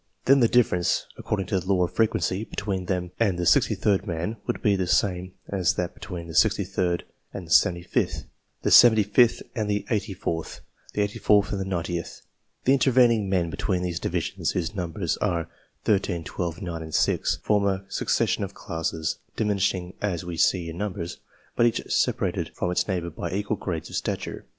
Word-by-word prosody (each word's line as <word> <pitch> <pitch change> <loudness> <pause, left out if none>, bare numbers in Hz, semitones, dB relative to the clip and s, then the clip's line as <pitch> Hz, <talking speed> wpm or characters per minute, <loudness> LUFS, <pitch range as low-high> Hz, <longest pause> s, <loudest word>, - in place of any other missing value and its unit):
Then 135 +1 +6
the 120 - +5
difference, 110 -8 +2
according 95 -3 -2
to 95 -1 0
the 90 - -9
law 90 -2 +3
of 85 - -2
frequency, 110 -3 +1
between 100 -4 -3
them 90 -1 -2
and 100 -6 +2
the 90 - -1
63rd 95 +4 +2
man 85 +6 -3
would - - -2
be 105 -2 +4
the 95 -2 -1
same 90 0 +1
as 95 -3 +1
that 90 +1 -2
between 85 -3 -7
the 85 - -9
63rd 90 -2 +1 0.3
and 95 - -5
the 80 - -12
75th, 85 +2 +2 0.4
the - - +1
75th 110 0 +6
and 110 -4 -2
the 105 0 -1
84th, 95 -6 -3 0.3
the 105 - +1
84th 105 0 +2
and 100 - -2
the - - -2
90th. 85 -2 -4 0.4
The 130 - +5
intervening 120 -6 +4
men 90 -3 +1
between 90 0 -1
these 85 -2 -2
divisions, - - -2
whose 85 -2 -2
numbers 90 -2 -2
are 85 -5 -1 0.4
13, 95 -5 +1
12, 85 +1 -4
9, 85 -2 -4
and 80 -1 -5
6, - - +2
form 105 -1 +2
a 95 0 -1
succession - - 0
of - - -6
classes, 80 -2 -3 0.2
diminishing 95 -4 0
as 90 -5 -1
we 90 -1 -5
see 85 +1 +2
in 85 +1 -7
numbers, 90 -4 -4 0.4
but 120 - +4
each 115 - 0
separated - - 0
from 90 - -1
its 90 - 0
neighbours 85 -4 -2
by - - -4
equal 100 +3 -1
grades 85 -6 -5
of - - -6
stature. - - -4
95 Hz, 180 wpm, -25 LUFS, 85-105 Hz, 0.4 s, Then